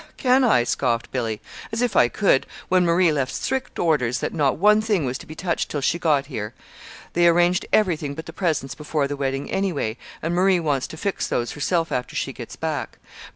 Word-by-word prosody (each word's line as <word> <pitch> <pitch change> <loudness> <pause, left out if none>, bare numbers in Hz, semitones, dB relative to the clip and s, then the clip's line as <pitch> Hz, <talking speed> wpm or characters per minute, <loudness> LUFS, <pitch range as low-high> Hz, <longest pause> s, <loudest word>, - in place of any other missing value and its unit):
"Humph! - - -25
Can 260 +1 +4
I?" 215 - +4
scoffed 120 -1 -1
Billy. 115 -4 -2 0.3
"As 225 +2 -1
if 245 - 0
I 120 - +6
could 160 - +2 0.2
when 185 0 +4
Marie 170 0 +4
left 140 -4 -1
strict 265 0 -3
orders 125 -8 +1
that - - -3
not 145 -5 +1
one 210 +5 +5
thing 210 -8 0
was 130 +1 -3
to - - -12
be 155 - -9
touched 170 0 -2
till 145 - -2
she 165 +5 0
got 150 -5 +2
here. 110 -6 -6 0.6
They 175 0 +4
arranged 175 +1 +3
everything 160 -9 +1
but 160 - -7
the - - -9
presents 155 -8 -1
before 150 +1 -1
the 145 - -3
wedding, 135 0 -3
anyway; 170 - -1 0.3
and 165 +2 -1
Marie 185 +1 +3
wants 145 -5 0
to 160 - -10
fix 195 +4 -2
those 120 0 -1
herself 165 +3 -1
after 125 - -3
she - - -2
gets - - -8
back. - - -4
160 Hz, 210 wpm, -23 LUFS, 135-180 Hz, 0.6 s, I